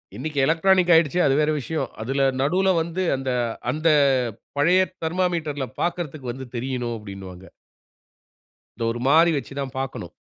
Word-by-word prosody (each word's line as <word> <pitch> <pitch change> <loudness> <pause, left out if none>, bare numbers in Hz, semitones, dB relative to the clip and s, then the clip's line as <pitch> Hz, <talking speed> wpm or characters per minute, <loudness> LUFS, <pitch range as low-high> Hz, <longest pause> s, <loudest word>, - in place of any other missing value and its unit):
இன்னைக்கு 145 +4 -3
எலக்ட்ரானிக் 180 +3 +3
ஆயிடுச்சு, 165 +1 +3
அது 135 - +3
வேற 155 0 +2
விஷயம். 155 +4 -3
அதுல 135 +4 0 0.2
நடுவுல 185 +7 +2
வந்து, 170 +3 -3
அந்த 135 0 -4 0.4
அந்த 155 +4 -1 0.7
பழைய 175 +6 +4 0.2
தெர்மாமீட்டர்ல 160 -5 -1 0.2
பாக்கிறதற்கு 155 -7 -3
வந்து 130 +2 -8
தெரியணும், 125 -1 -3
அப்படின்னுவாங்க. 95 -3 -10 1.3
இத 115 - -3
ஒரு 120 - -5
மாறி 165 +4 +5
வச்சுதான் 140 -1 -4
பாக்கணும். 135 -1 -5
145 Hz, 130 wpm, -23 LUFS, 130-170 Hz, 1.3 s, மாறி